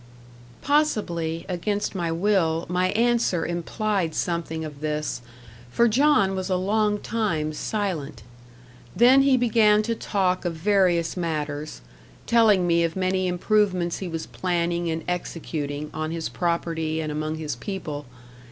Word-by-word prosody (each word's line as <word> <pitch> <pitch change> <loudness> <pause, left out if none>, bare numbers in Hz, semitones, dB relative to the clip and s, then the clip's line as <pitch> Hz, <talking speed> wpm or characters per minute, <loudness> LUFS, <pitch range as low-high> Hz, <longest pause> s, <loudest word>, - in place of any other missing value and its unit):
Possibly, 175 - 0
against 200 +3 -2
my 170 -4 -2
will, 165 -2 +1
my 180 +1 +1
answer 230 -6 +2
implied 175 +1 -2
something 165 -2 -2
of 150 -2 -9
this; 150 -4 -2 0.5
for 235 - +3
John 230 -5 +3
was 190 0 -3
a 185 - +2
long 210 +3 +1
time 185 -9 -1
silent. 155 - -3 0.7
Then 255 +4 +6
he 270 -1 +4
began 220 -3 +4
to 230 +2 -1
talk 190 -4 0
of 175 -2 -2
various 175 -2 +2
matters; 150 - -3 0.4
telling 215 -6 +4
me 170 -1 +3
of 165 -1 -1
many 185 0 0
improvements 180 -1 +1
he 190 - -4
was 165 -1 -4
planning 175 -1 -1
and 160 0 -3
executing, 150 -4 -4
on 155 0 -3
his 165 0 -3
property, 165 -2 -1
and 155 -1 -3
among 155 +1 -2
his 155 -4 -4
people. 150 -3 -6
175 Hz, 135 wpm, -24 LUFS, 160-205 Hz, 0.7 s, Then